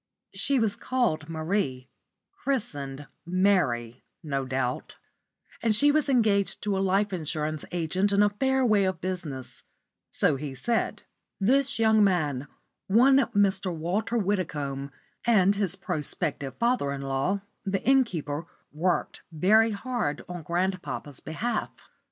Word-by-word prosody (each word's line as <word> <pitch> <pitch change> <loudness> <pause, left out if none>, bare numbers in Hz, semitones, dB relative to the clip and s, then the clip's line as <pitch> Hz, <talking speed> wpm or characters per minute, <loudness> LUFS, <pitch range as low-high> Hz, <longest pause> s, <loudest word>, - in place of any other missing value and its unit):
She 280 - +1
was 220 -4 +1
called 195 -12 -1
Marie 160 -5 -2 0.6
christened 145 - -2 0.2
Mary 165 - +1 0.2
no 135 -3 -2
doubt 130 -1 -2 0.7
and 225 -2 +4
she 290 +7 +5
was 295 -1 +1
engaged 215 -6 +2
to 205 -2 0
a - - 0
life 195 +1 +1
insurance 155 -2 -2
agent 180 +4 0
in 200 +1 +4
a 205 - +3
fair 265 +4 +1
way 210 -4 +4
of 185 0 -1
business 165 -8 -5 0.5
so - - +1
he 140 -1 -6
said. 230 - -1 0.4
This 270 +7 +2
young 220 -1 +4
man 150 -8 +1 0.4
one 250 +7 +5
Mr. 200 -6 +2
Walter 180 +8 -1
Widdicombe 150 -9 -2 0.4
and 200 -4 +5
his 195 -3 -1
prospective 145 -4 -3
father 235 - +1
in 140 0 -4
law, 135 +9 -1 0.2
the 195 -2 -2
innkeeper, 170 - +1 0.2
worked 170 +4 -1
very 210 +8 +4
hard 220 - -2
on 180 -1 -6
grandpapa's 175 -4 -3
behalf. 225 +10 -2
185 Hz, 125 wpm, -27 LUFS, 150-215 Hz, 0.7 s, she